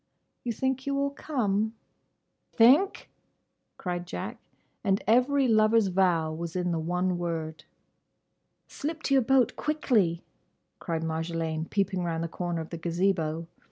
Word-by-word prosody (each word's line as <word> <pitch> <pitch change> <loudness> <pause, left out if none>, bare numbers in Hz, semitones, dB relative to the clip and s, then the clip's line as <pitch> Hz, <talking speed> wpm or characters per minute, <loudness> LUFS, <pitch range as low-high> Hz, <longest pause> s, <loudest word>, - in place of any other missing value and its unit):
"You 240 - -1
think 265 +3 -2
you 280 - 0
will 280 0 0
come?" 220 -7 -1 0.8
"Think!" 280 - +4 0.7
cried 175 -1 -4
Jack; 90 - -5 0.5
and 195 0 +1
every 255 +4 +3
lover's 215 -2 +4
vow 175 -4 +2
was 165 +1 -5
in 180 -1 0
the 165 - 0
one 180 +2 -1
word. 160 -2 -4 1.0
"Slip 310 +2 -5
to 275 - +1
your 270 - +6
boat, 250 -1 +3
quickly!" 225 - +1 0.6
cried 165 -3 -3
Marjolaine, 160 0 -2
peeping 190 -2 0
round 165 -1 -2
the - - -1
corner 175 0 -3
of 160 - -9
the 170 - -5
Gazebo. 170 -2 0
185 Hz, 135 wpm, -28 LUFS, 165-245 Hz, 1.0 s, your